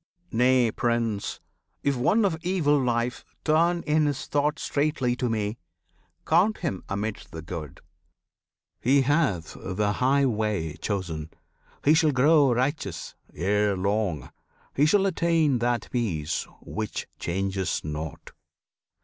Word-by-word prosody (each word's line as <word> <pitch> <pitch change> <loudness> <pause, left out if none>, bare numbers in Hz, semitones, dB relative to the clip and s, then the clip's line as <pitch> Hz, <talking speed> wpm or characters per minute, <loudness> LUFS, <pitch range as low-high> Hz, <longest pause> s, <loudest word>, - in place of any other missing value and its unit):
Nay, 125 0 +3
Prince! 115 -4 -1 0.4
If 140 -1 +2
one 205 - +3
of 185 -5 +1
evil 160 -5 +2
life 120 -1 -1 0.2
turn 170 +2 +3
in 150 0 +2
his 145 -2 -2
thought 145 +1 0
Straightly 145 -4 0
to 125 -1 -1
Me, 110 0 -2 0.7
count 185 +7 +3
him 145 - -3
amidst 100 -3 -4
the 80 -1 -7
good; 80 -5 -7 1.0
He 135 +2 +3
hath 130 - +1
the 105 +2 -1
high 135 +5 +3
way 105 - -1
chosen; 85 -7 -3 0.6
he 150 - +6
shall 155 -1 +4
grow 140 +1 +5
Righteous 125 - -2 0.2
ere 100 +3 +1
long; 100 - -1 0.4
he 145 +3 +4
shall 195 +4 +4
attain 165 -7 +2
that 120 0 0
peace 85 -10 -1
Which 110 -1 -4
changes 95 +1 -1
not. 75 0 -6
120 Hz, 125 wpm, -26 LUFS, 100-145 Hz, 1.0 s, he